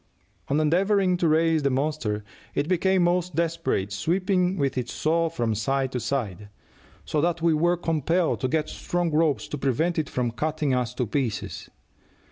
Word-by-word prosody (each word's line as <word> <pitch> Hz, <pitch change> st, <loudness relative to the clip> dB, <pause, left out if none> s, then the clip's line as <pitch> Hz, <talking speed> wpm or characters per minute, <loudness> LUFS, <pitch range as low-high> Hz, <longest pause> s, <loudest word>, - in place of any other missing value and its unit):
On 145 Hz, +2 st, +1 dB
endeavoring 185 Hz, +4 st, +3 dB
to 175 Hz, -, +1 dB
raise 160 Hz, 0 st, +3 dB
the 140 Hz, -, +2 dB
monster 130 Hz, -6 st, -1 dB, 0.3 s
it 145 Hz, -, 0 dB
became 185 Hz, +1 st, +2 dB
most 175 Hz, -1 st, +1 dB
desperate, 165 Hz, -, -1 dB
sweeping 180 Hz, -, +1 dB
with 140 Hz, -3 st, 0 dB
its 125 Hz, -2 st, -3 dB
saw 165 Hz, +1 st, +1 dB
from 120 Hz, -8 st, -1 dB
side 135 Hz, +5 st, 0 dB
to 125 Hz, -, -2 dB
side, 105 Hz, -5 st, -3 dB, 0.6 s
so 150 Hz, -, 0 dB
that 170 Hz, 0 st, 0 dB
we 165 Hz, -1 st, +4 dB
were 175 Hz, +3 st, +2 dB
compelled 165 Hz, +1 st, 0 dB
to 130 Hz, -, +1 dB
get 155 Hz, +3 st, 0 dB
strong 175 Hz, 0 st, -2 dB
ropes 155 Hz, -2 st, +1 dB
to 150 Hz, -, -4 dB
prevent 160 Hz, +6 st, +1 dB
it 155 Hz, -, -2 dB
from 125 Hz, -2 st, -1 dB
cutting 150 Hz, +2 st, -1 dB
us 125 Hz, -1 st, -1 dB
to 125 Hz, -, 0 dB
pieces. 115 Hz, -2 st, -3 dB
155 Hz, 170 wpm, -25 LUFS, 130-170 Hz, 0.6 s, we